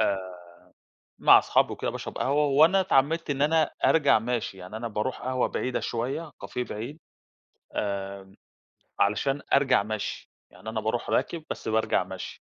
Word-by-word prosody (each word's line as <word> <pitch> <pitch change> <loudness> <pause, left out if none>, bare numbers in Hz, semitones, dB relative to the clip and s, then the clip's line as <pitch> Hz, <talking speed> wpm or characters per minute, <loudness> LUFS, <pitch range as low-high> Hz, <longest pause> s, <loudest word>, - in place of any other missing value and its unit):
آآ، 95 -4 -1 0.8
مع - - +8
أصحابي - - +2
وكده - - -3
باشرَب - - -6
قهوة 145 +3 +2
وأنا 155 +7 +5
اتعمّدت 165 -1 +1
إن 140 -1 -1
أنا 160 +2 +4 0.2
أرجَع 145 -8 +4
ماشي، 115 -4 -3
يعني 95 +4 -8
أنا 115 +1 -4
باروح 110 +4 -3
قهوة 130 0 0
بعيدة 125 - -2
شوية، 135 +7 -3
كافيه 125 - -3
بعيد 125 +8 -7 0.8
آمم، 100 -1 -4 0.6
علشان 135 +8 +1
أرجَع 135 -6 +4
مشْي، 110 0 -5 0.2
يعني 110 - -9
أنا 110 -1 -3
بارُوح 110 +2 -2
راكب 165 -2 0
بس - - -6
بارجَع 110 0 +1
مشْي. - - -8
125 Hz, 150 wpm, -27 LUFS, 105-145 Hz, 0.8 s, مع